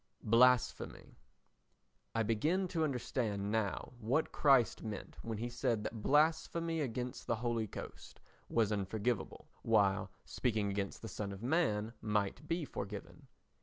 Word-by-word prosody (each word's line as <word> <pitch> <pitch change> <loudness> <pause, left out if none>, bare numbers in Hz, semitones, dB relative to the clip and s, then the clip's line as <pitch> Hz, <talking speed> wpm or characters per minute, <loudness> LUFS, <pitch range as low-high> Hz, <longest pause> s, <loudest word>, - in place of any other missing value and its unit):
Blasphemy 120 - +3 1.0
I 115 - +3
begin 155 - +1
to 165 -2 0
understand 115 -7 -1
now 110 +1 -1
what 125 +8 +1
Christ 135 -5 +4
meant 110 -3 -6
when 115 -2 -4
he 120 +3 -2
said 120 -3 0
that 110 - -4
blasphemy 160 +3 +2
against 125 -2 -4
the 115 - +2
Holy 115 -1 -1
Ghost - - -9 0.3
was 110 -3 +2
unforgiveable, 105 +3 -2
while 100 -3 +3 0.2
speaking 110 -5 0
against 100 +1 -3
the - - -4
Son 105 -2 -4
of 100 +2 -8
Man 115 -7 +1
might 105 +7 -1
be 165 0 -1
forgiven. 100 -5 -7
115 Hz, 130 wpm, -35 LUFS, 105-130 Hz, 1.0 s, Christ